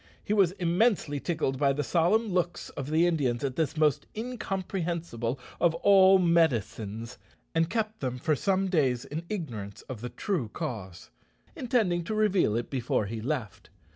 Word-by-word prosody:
He 210 - -1
was 195 -4 +4
immensely 180 -4 +1
tickled 145 -5 -1
by 140 -1 +3
the 145 +2 -1
solemn 185 - +2
looks 175 -2 -1
of 140 0 -6
the 160 +2 +3
Indians 140 -8 0
at 135 -2 -2
this 160 -2 -1
most 150 -3 +2
incomprehensible 175 - -3 0.2
of 170 -1 +3
all 190 +2 +6
"medicines," 120 - 0 0.3
and 165 0 +2
kept 220 0 -2
them 125 -2 -3
for 155 +4 +1
some 195 +5 +1
days 135 -9 +1
in 155 +3 -5
ignorance 115 - -5
of 125 -5 -8
the 125 - -4
true 170 - -2
cause, 95 -7 -6 0.4
intending 215 -9 +1
to 215 - -2
reveal 200 - +2
it 120 - -4
before 125 -5 0
he 110 +2 -5
left. 110 -4 -4
160 Hz, 160 wpm, -28 LUFS, 125-190 Hz, 0.4 s, all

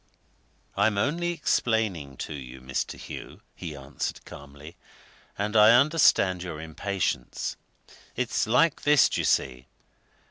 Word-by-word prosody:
"I'm 105 +1 +2
only 165 +10 0
explaining 105 - -1
to - - -7
you, 65 -2 -9
Mr. 65 0 -4
Hugh," - - -9
he 85 -5 -7
answered, 70 -1 -6
calmly. 70 +3 -12 0.6
"And 105 +2 -2
I 110 +3 +7
understand 140 - +3
your 85 -4 -6
impatience. 80 -4 -3 0.6
It's - - -1
like 130 +8 +3
this, 150 -1 +5
d'ye - - -1
see? 65 -1 0
95 Hz, 115 wpm, -26 LUFS, 70-115 Hz, 0.6 s, I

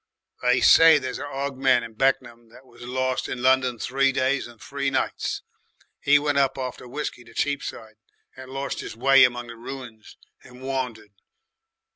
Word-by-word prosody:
"They 125 0 +2
say 165 -1 +7
there's 130 -3 -4
a 145 - -5
'og 140 -1 -4
man 130 -3 +3
in 115 -1 -9
Beck'n'am 120 -2 -1
what 125 +3 -17
was 120 -2 -19
lost 130 +1 -2
in 125 -1 -5
London 130 -2 +3
three 135 +4 +1
days 130 0 0
and 120 -2 -16
three 140 +3 -3
nights. 135 - -2 0.6
'E 145 +1 +7
went 145 -1 +1
up 135 -1 +1
after 130 -1 -6
whiskey 125 -1 -5
to 115 -1 -18
Cheapside, 120 -6 -3 0.4
and 130 0 -11
lorst 135 +1 -4
'is - - -8
way 135 +2 +6
among 120 -1 +1
the 120 -1 -10
ruins 115 -2 -10 0.3
and 125 +1 -14
wandered. 125 -6 -4
130 Hz, 170 wpm, -24 LUFS, 120-135 Hz, 0.6 s, say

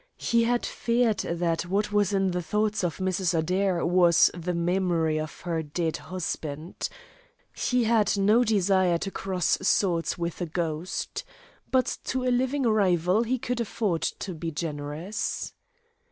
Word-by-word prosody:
He 230 0 +2
had 240 +1 +1
feared 235 -3 +1
that 170 0 -1
what 205 +3 0
was 205 -1 +2
in 195 -2 +1
the 180 0 -1
thoughts 210 +5 0
of 175 -3 -1
Mrs. 185 -2 0
Adair 180 +2 +1
was 175 -1 +5
the 175 0 -3
memory 170 -3 +1
of 155 0 -6
her 170 -2 -2
dead 160 +1 -2
husband. 160 -3 -5 0.7
He 250 -1 +1
had 220 -3 +2
no 210 +5 +4
desire 190 -5 +3
to 195 +3 -4
cross 185 -3 0
swords 180 -3 +1
with 170 0 -4
a 175 - -1
ghost. 165 +1 -3 0.5
But 260 -1 +1
to 260 -1 -1
a 250 -1 +2
living 260 +3 +1
rival 190 -3 +3
he 245 +2 0
could 245 0 -2
afford 205 -6 -1
to 190 - -3
be 165 0 -4
generous. 155 +4 -4
185 Hz, 150 wpm, -27 LUFS, 170-210 Hz, 0.7 s, was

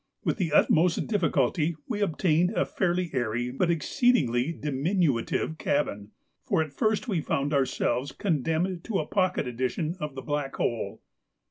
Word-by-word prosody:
With - - 0
the 175 -6 -1
utmost 165 +3 +3
difficulty 165 - +1
we 215 -5 -2
obtained 175 -2 +2
a - - +3
fairly 180 -2 -1
airy 120 -1 -1
but 170 +7 0
exceedingly 165 - +2
diminutive 150 - 0
cabin, 105 -8 -1 0.3
for 160 - +1
at 155 -3 -10
first 215 - 0
we 185 -8 0
found 145 0 -1
ourselves 135 -1 0
condemned 170 +2 -1
to 220 -4 -1
a 155 - -1
pocket 185 -3 0
edition 130 +7 -2
of 150 -4 -5
the 135 - -6
Black 145 -2 -2
Hole. 120 - -2
155 Hz, 145 wpm, -27 LUFS, 135-180 Hz, 0.3 s, utmost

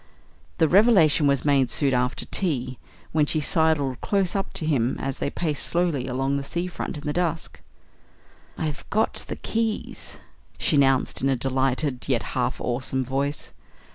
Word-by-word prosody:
The 160 - +4
revelation 175 -6 +5
was 140 -1 +1
made 135 -3 +3
soon 140 -3 +1
after 125 +1 0
tea, 130 -9 -1 0.3
when 150 -1 +2
she 155 - 0
sidled 150 -5 +1
close 195 -3 0
up 195 - -2
to 160 - -3
him 130 -6 +1
as 135 - -3
they - - -1
paced 150 -2 -2
slowly 170 -7 0
along 135 +2 0
the 140 - -3
sea 170 +5 -3
front 180 -3 -5
in 145 - -9
the 150 - -1
dusk. 165 -2 -2 1.0
"I've 150 -3 -4
got 215 +1 0
the - - -4
keys," 225 -1 -3 0.4
she - - +2
announced 135 -2 +2
in 135 - +2
a 135 - +2
delighted, 130 +1 -1
yet 125 -4 +1
half 130 0 -1
awesome 125 +1 -2
voice. 140 +3 -2
140 Hz, 165 wpm, -24 LUFS, 130-165 Hz, 1.0 s, revelation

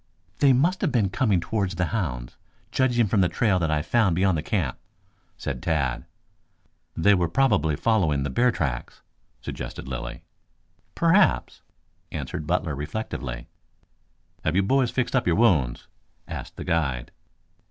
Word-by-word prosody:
"They 140 -2 +6
must 165 +9 +2
have 180 - +1
been 105 -6 +1
coming 105 -7 +2
towards 100 0 -2
the 90 +1 0
hounds, 60 - -3 0.4
judging 125 -3 +2
from 100 0 +2
the 90 - +3
trail 95 +2 +2
that 85 -2 0
I 75 -1 +1
found 100 -2 +2
beyond 95 0 +2
the 75 - -1
camp," - - -2 0.6
said 65 -3 -4
Tad. 75 -6 -1 0.9
"They 100 +5 +5
were 90 -3 +2
probably 80 - +2
following 80 -7 +1
the 70 - -3
bear 125 - +3
tracks," 65 - -4 0.4
suggested - - -6
Lilly. 65 -2 -6 0.7
"Perhaps," 180 +4 +3 0.5
answered 75 - -5
Butler 85 -2 0
reflectively. 70 - -5 1.0
"Have 80 - 0
you 100 - +3
boys 130 +4 +2
fixed 130 +1 -1
up 125 - +1
your 85 - +3
wounds?" 80 - +2 0.4
asked - - -7
the - - -6
guide. 75 -8 -1
90 Hz, 145 wpm, -25 LUFS, 75-115 Hz, 1.0 s, They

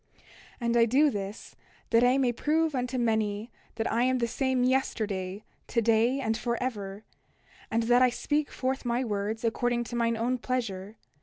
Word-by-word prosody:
29:9 - - -30 0.4
And 235 0 +1
I 230 - +6
do 275 +6 +4
this 200 -1 -6 0.4
that 230 +1 +5
I 250 +2 +4
may 260 -3 +2
prove 310 +6 +1
unto 250 0 -2
many 220 -1 0 0.2
that 225 0 -1
I 230 - +1
am 255 +1 +2
the 235 -1 0
same 260 +1 0
yesterday, 210 -7 -1 0.2
today, 230 +3 +2
and 225 -4 0
forever; 220 -4 -3 0.7
and 230 +1 +1
that 245 +2 +4
I 255 - +6
speak 290 +4 -1
forth 265 +1 -2
my 240 +1 0
words 215 0 -2
according 240 +1 0
to 240 - -7
mine 230 -1 +1
own 245 +3 0
pleasure. 220 -5 -3
235 Hz, 170 wpm, -28 LUFS, 220-255 Hz, 0.7 s, I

